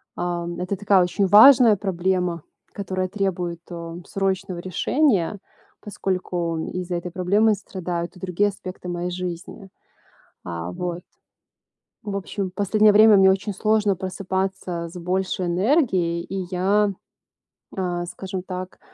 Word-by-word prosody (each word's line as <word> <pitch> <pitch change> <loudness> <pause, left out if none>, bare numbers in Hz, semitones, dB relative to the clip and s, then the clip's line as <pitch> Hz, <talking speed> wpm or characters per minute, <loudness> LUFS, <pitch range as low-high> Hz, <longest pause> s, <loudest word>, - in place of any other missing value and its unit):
ам, 175 -1 -3
это 185 +2 -2
такая 200 -2 +4
очень 180 +3 0
важная 230 +3 +8
проблема, 180 -3 -1 0.3
которая 185 -2 -3
требует, 180 -4 -2
э, 170 -1 -7
срочного 195 -2 -2
решения, 200 - +1 0.4
поскольку 180 -4 -2
из-за 180 -1 -3
этой 175 +1 -4
проблемы 200 +5 +2
страдают 180 -3 -5
и - - -14
другие 190 +2 0
аспекты 185 -2 -9
моей 175 0 -3
жизни. 180 +2 -6 0.8
А, 85 0 -5
вот. 175 - -4 1.0
В 205 -2 -4
общем, 195 0 -3
последнее 205 +3 +3
время 215 +1 +7
мне 190 0 +6
очень 195 +2 0
сложно 215 0 +2
просыпаться 190 -2 -3
с 180 - -9
большей 185 +1 -1
энергией, 180 - +1
и 190 -1 -5
я, 200 +3 +2 0.8
а, 175 -2 -2
скажем 190 +1 -6
так, 185 0 -7
185 Hz, 125 wpm, -23 LUFS, 175-200 Hz, 1.0 s, важная